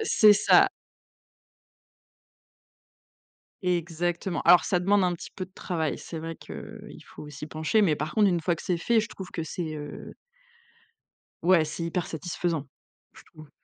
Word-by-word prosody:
c'est 215 Hz, -, +6 dB
ça. 210 Hz, +1 st, +5 dB, 3.0 s
Exactement. 175 Hz, 0 st, -1 dB
Alors 180 Hz, -, +6 dB
ça 180 Hz, -, +1 dB
demande 195 Hz, +2 st, +3 dB
un 180 Hz, -, +1 dB
petit 170 Hz, -, -8 dB
peu 185 Hz, -, -4 dB
de 185 Hz, -, -27 dB
travail. 160 Hz, -4 st, -2 dB
C'est 165 Hz, -, -7 dB
vrai 165 Hz, +1 st, -5 dB
qu'il -, -, -10 dB
faut 150 Hz, -, -11 dB
s'y 150 Hz, +1 st, -8 dB
pencher, 155 Hz, +8 st, +1 dB
mais 160 Hz, -6 st, +3 dB
par 150 Hz, +1 st, -4 dB
contre 210 Hz, -2 st, +5 dB
une 175 Hz, -3 st, +1 dB
fois 170 Hz, +1 st, +1 dB
que -, -, -10 dB
c'est 180 Hz, -, 0 dB
fait, 230 Hz, +7 st, +2 dB
je 220 Hz, -, -2 dB
trouve 190 Hz, -4 st, -9 dB
que 165 Hz, -, -3 dB
c'est, 160 Hz, -1 st, -5 dB
heu 145 Hz, -1 st, -8 dB, 1.3 s
ouais, 175 Hz, -3 st, +5 dB
c'est 155 Hz, +2 st, -5 dB
hyper 170 Hz, +1 st, -2 dB
satisfaisant 165 Hz, -2 st, -3 dB, 0.5 s
je -, -, -16 dB
trouve. 155 Hz, -1 st, -15 dB
170 Hz, 160 wpm, -27 LUFS, 160-185 Hz, 3.0 s, c'est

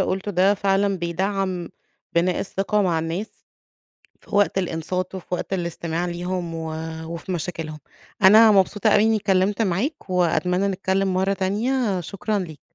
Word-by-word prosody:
قُلته 190 Hz, +2 st, -1 dB
ده 190 Hz, +2 st, +3 dB
فعلًا 195 Hz, -1 st, +1 dB
بيدعَّم 185 Hz, +1 st, -2 dB, 0.4 s
بناء 175 Hz, +1 st, +1 dB
الثقة 200 Hz, +2 st, 0 dB
مع 170 Hz, -3 st, +1 dB
الناس 165 Hz, +6 st, -5 dB, 0.8 s
في -, -, -7 dB
وقت 205 Hz, -1 st, +3 dB
الإنصات 180 Hz, +1 st, -2 dB
وفي 185 Hz, -, -7 dB
وقت 190 Hz, -, -5 dB
الاستماع 170 Hz, -1 st, -2 dB
ليهم، 175 Hz, 0 st, -3 dB
و 160 Hz, -1 st, -4 dB, 0.4 s
وفي 170 Hz, +3 st, -6 dB
مشاكلهم. 160 Hz, -3 st, -4 dB, 0.4 s
أنا 215 Hz, +3 st, +8 dB
مبسوطة 205 Hz, +2 st, +3 dB
أوي 210 Hz, 0 st, +5 dB
إنّي 225 Hz, 0 st, +3 dB
اتكلِّمت 200 Hz, +1 st, +1 dB
معاك 205 Hz, -, -1 dB
وأتمنّى 180 Hz, +2 st, +1 dB
نتكلِّم 190 Hz, 0 st, 0 dB
مرّة 190 Hz, +2 st, +1 dB
تانية، 205 Hz, +2 st, 0 dB
شكرًا 200 Hz, +5 st, -2 dB
ليك. 160 Hz, -7 st, -7 dB
190 Hz, 140 wpm, -23 LUFS, 175-200 Hz, 0.8 s, أنا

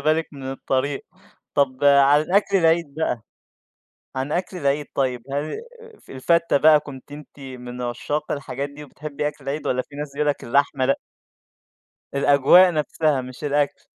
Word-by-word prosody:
بالِك 155 Hz, +1 st, +1 dB
من 140 Hz, -, -10 dB
الطريق. 135 Hz, +1 st, -2 dB, 0.5 s
طَب 140 Hz, 0 st, +1 dB
عن 140 Hz, +1 st, +6 dB
الأكل 195 Hz, +4 st, +2 dB
العيد 165 Hz, -3 st, +2 dB
بقى، 125 Hz, -8 st, -2 dB, 0.9 s
عن 135 Hz, +3 st, -2 dB
أكل 180 Hz, +1 st, -2 dB
العيد 145 Hz, -2 st, 0 dB
طيّب 125 Hz, -3 st, -1 dB
هل 145 Hz, +2 st, -2 dB, 0.5 s
ف -, -, -17 dB
الفتّة 170 Hz, +4 st, +2 dB
بقى 150 Hz, +1 st, +6 dB
كنتِ 140 Hz, 0 st, -11 dB
أنتِ 150 Hz, 0 st, -12 dB
من 125 Hz, -2 st, -8 dB
عشّاق 125 Hz, +5 st, -3 dB
الحاجات 140 Hz, 0 st, -4 dB
دي، 150 Hz, +1 st, -10 dB
وبتحبي 150 Hz, +1 st, -4 dB
أكل 145 Hz, -2 st, -11 dB
العيد 140 Hz, +3 st, -4 dB
والّا 125 Hz, 0 st, 0 dB
في 145 Hz, -, -15 dB
ناس 145 Hz, -1 st, -5 dB
بيقولوا 150 Hz, 0 st, +1 dB
لَك -, -, -14 dB
اللحمة 135 Hz, +1 st, +1 dB
لأ؟ 135 Hz, -, +2 dB, 1.2 s
الأجواء 145 Hz, +6 st, +6 dB
نفسها 150 Hz, -2 st, 0 dB
مش 130 Hz, +3 st, -9 dB
الأكل. 145 Hz, 0 st, 0 dB
145 Hz, 155 wpm, -22 LUFS, 135-150 Hz, 1.2 s, عن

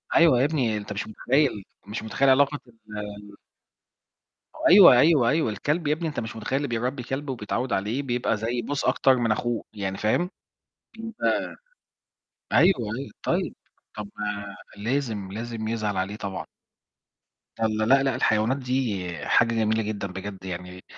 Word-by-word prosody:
أيوة 160 Hz, -8 st, +6 dB
يا 130 Hz, -, +4 dB
ابني، 130 Hz, -8 st, 0 dB
أنت 105 Hz, 0 st, -6 dB
مش 105 Hz, -, -4 dB
متخيل، 130 Hz, -1 st, +1 dB, 0.2 s
مش 110 Hz, +2 st, -5 dB
متخيل 120 Hz, +5 st, +1 dB
علاقة 140 Hz, +2 st, +4 dB
ال 105 Hz, -2 st, -9 dB, 1.3 s
أيوه، 190 Hz, -4 st, +10 dB
أيوه، 145 Hz, -5 st, +5 dB
أيوه 155 Hz, -6 st, +1 dB
الكلب 145 Hz, -, -1 dB
يا 150 Hz, -, +3 dB
ابني، 165 Hz, +2 st, -3 dB
أنت 150 Hz, -, -3 dB
مش 115 Hz, 0 st, -6 dB
متخيل 110 Hz, +4 st, -2 dB
اللي 145 Hz, +1 st, -1 dB
بيربي 125 Hz, +2 st, -2 dB
كلب 135 Hz, +4 st, -4 dB
وبيتعود 125 Hz, +1 st, -2 dB
عليه 110 Hz, +8 st, -1 dB
بيبقى 120 Hz, -3 st, 0 dB
زي 115 Hz, +3 st, -2 dB
بُص 140 Hz, +5 st, -3 dB
أكتر 135 Hz, -1 st, +4 dB
من 115 Hz, -2 st, +1 dB
أخوه، 120 Hz, +1 st, -1 dB
يعني 95 Hz, -2 st, -4 dB
فاهم، 140 Hz, +12 st, +1 dB, 0.7 s
أنت 225 Hz, 0 st, -7 dB, 1.4 s
أيوه، 190 Hz, +3 st, +6 dB, 0.2 s
أيوه. 135 Hz, +1 st, -6 dB
طيب، -, -, -1 dB, 0.4 s
طب 105 Hz, -1 st, -6 dB, 0.7 s
لازم، 110 Hz, -3 st, -2 dB
لازم 115 Hz, +1 st, -5 dB
يزعل 110 Hz, -3 st, -2 dB
عليه 95 Hz, +2 st, -2 dB
طبعًا. 100 Hz, -3 st, -5 dB, 1.1 s
والَّا، 110 Hz, -1 st, +1 dB
لأ 135 Hz, +4 st, +5 dB
لأ 135 Hz, -2 st, +1 dB
الحيوانات 110 Hz, 0 st, +2 dB
دي 125 Hz, -7 st, -1 dB, 0.2 s
حاجة 115 Hz, -1 st, +3 dB
جميلة 110 Hz, 0 st, +1 dB
جدًا 105 Hz, -2 st, -3 dB
بجد 95 Hz, 0 st, -8 dB
يعني. 90 Hz, 0 st, -7 dB
115 Hz, 150 wpm, -25 LUFS, 105-135 Hz, 1.4 s, أيوه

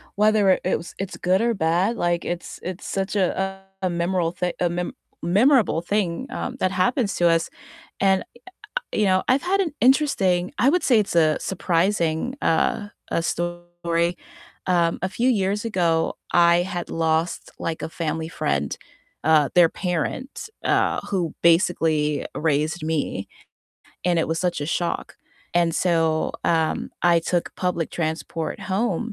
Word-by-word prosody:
whether 210 Hz, -1 st, +4 dB
it -, -, +2 dB
it 185 Hz, -, +1 dB
was 170 Hz, -, -10 dB
it's 195 Hz, -1 st, -5 dB
good 185 Hz, +3 st, +2 dB
or 235 Hz, 0 st, +2 dB
bad, 180 Hz, +6 st, +1 dB
like, 175 Hz, 0 st, 0 dB
it's 175 Hz, 0 st, -5 dB
it's 185 Hz, 0 st, -6 dB
such 195 Hz, +1 st, -2 dB
a 190 Hz, -2 st, +1 dB, 0.4 s
a 185 Hz, -, +1 dB
a -, -, -1 dB
memorable 175 Hz, 0 st, -1 dB
th 180 Hz, -1 st, -1 dB
a 175 Hz, -, +2 dB
mem 175 Hz, +1 st, -3 dB, 0.3 s
memorable 210 Hz, -, +3 dB
thing, 200 Hz, +4 st, -1 dB
um, 250 Hz, -, -4 dB
that 185 Hz, -, +1 dB
happens 200 Hz, +4 st, +1 dB
to 175 Hz, -, +3 dB
us. 165 Hz, 0 st, +2 dB, 0.5 s
And, 190 Hz, -1 st, +3 dB, 0.7 s
you 215 Hz, -, +1 dB
know, 185 Hz, -1 st, +3 dB
I've 260 Hz, +2 st, +3 dB
had 390 Hz, +2 st, +1 dB
an 320 Hz, -6 st, -1 dB
interesting 195 Hz, -10 st, +3 dB
I 265 Hz, -, +5 dB
would 360 Hz, +2 st, +2 dB
say 240 Hz, -5 st, +4 dB
it's 200 Hz, -4 st, -1 dB
a 155 Hz, -2 st, +4 dB
surprising, 175 Hz, +4 st, 0 dB
uh, 205 Hz, +5 st, +1 dB, 0.2 s
uh, -, -, +1 dB
story. 175 Hz, 0 st, -2 dB, 0.5 s
Um, 170 Hz, -2 st, +2 dB
a 185 Hz, -, +1 dB
few 240 Hz, +6 st, 0 dB
years 205 Hz, -3 st, +1 dB
ago, 170 Hz, -7 st, +1 dB, 0.2 s
I 170 Hz, 0 st, +5 dB
had 180 Hz, -2 st, -5 dB
lost, 160 Hz, +1 st, 0 dB
like, 165 Hz, -1 st, -3 dB
a -, -, -3 dB
family 160 Hz, -1 st, -3 dB
friend, 70 Hz, -, -1 dB, 0.5 s
uh, 155 Hz, -2 st, +4 dB
their 175 Hz, -2 st, +7 dB
parent, 190 Hz, -, -3 dB, 0.2 s
uh, -, -, +2 dB
who 175 Hz, -5 st, -1 dB
basically 160 Hz, -3 st, +2 dB
raised 155 Hz, +2 st, 0 dB
me, 150 Hz, -11 st, -2 dB, 0.8 s
and 175 Hz, -2 st, +2 dB
it -, -, +1 dB
was 165 Hz, 0 st, -1 dB
such 175 Hz, -4 st, -1 dB
a 145 Hz, -, -3 dB
shock. 170 Hz, +1 st, -2 dB, 0.4 s
And 170 Hz, -1 st, +2 dB
so, 165 Hz, -3 st, +1 dB
um, 160 Hz, -2 st, +1 dB
I 170 Hz, -1 st, +5 dB
took 175 Hz, +1 st, -1 dB
public 180 Hz, -3 st, -1 dB
transport 160 Hz, 0 st, -3 dB
home, 210 Hz, +2 st, -1 dB
175 Hz, 155 wpm, -23 LUFS, 165-195 Hz, 0.8 s, their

